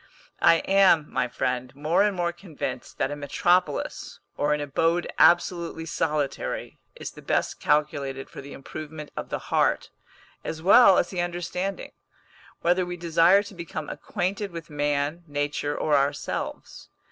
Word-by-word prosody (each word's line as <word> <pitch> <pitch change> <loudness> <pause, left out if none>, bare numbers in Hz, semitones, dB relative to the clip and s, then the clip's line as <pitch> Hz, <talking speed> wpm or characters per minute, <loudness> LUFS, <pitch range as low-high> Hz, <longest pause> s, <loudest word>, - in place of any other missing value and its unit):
I - - +7
am, 190 -6 +4
my - - +1
friend, 125 +1 -3
more 155 +6 +1
and 205 -1 +2
more 175 -1 0
convinced 155 -8 -6
that 135 - 0
a - - -3
metropolis, 150 +3 0 0.2
or 145 +1 0
an 150 - +1
abode 165 +4 +1
absolutely 170 -1 +3
solitary, 150 -3 -2 0.2
is - - -7
the - - -13
best - - -1
calculated 140 -3 0
for - - -10
the 140 +1 -10
improvement 150 +2 -8
of - - -5
the - - -2 0.2
heart, - - +2 0.5
as 160 - -4
well 195 +3 +7
as 175 - +1
the 180 -2 -1
understanding; 175 +2 -3 0.7
whether 180 +2 +2
we 175 0 -5
desire 170 +3 +4
to 205 - -11
become 170 -3 -6
acquainted 195 +3 -3
with 165 -3 -9
man, 145 +3 -1
nature, 145 0 -2
or 150 - +2
ourselves. 140 +1 -2
160 Hz, 145 wpm, -26 LUFS, 145-175 Hz, 0.7 s, I